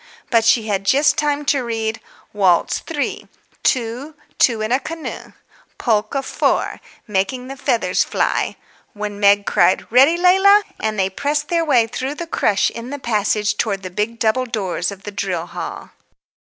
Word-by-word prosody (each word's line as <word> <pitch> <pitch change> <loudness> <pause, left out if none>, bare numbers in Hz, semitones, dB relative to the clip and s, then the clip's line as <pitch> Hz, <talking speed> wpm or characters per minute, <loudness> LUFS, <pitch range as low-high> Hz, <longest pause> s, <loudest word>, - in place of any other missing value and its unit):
but 230 -2 +4
she 225 0 +3
had 200 -3 -1
just 285 +7 +3
time 295 0 -1
to 280 -3 +1
read: 225 -1 -3 0.3
"Waltz 190 -4 +2
3. 295 -4 -4 0.3
Two, 255 +5 -1 0.2
Two 230 -3 +4
in 215 +1 -2
a 255 - +3
Canoe. 320 +3 -7 0.4
Polka 225 +3 0
4. - - -1 0.2
Making 215 +6 -2
the 270 - -6
Feathers 225 -8 +1
Fly," - - -1 0.4
when 205 -1 -5
Meg 200 0 +4
cried, - - +2
"Ready, 270 +8 +5
Leila?" 385 +3 +5 0.2
and 215 -1 -2
they 190 -1 +2
pressed 285 +9 -2
their 335 -1 +1
way 260 -7 +3
through 260 +5 -4
the 340 - -5
crush 210 -10 +1
in 235 +1 -8
the 285 - -5
passage 210 -4 0
towards 200 -4 -1
the 185 - -6
big 210 +5 -2
double 235 +3 +1
doors 195 -5 -2
of 195 -1 -11
the 205 - -6
drill 190 -4 -3
hall. - - -7
230 Hz, 165 wpm, -19 LUFS, 205-280 Hz, 0.4 s, Ready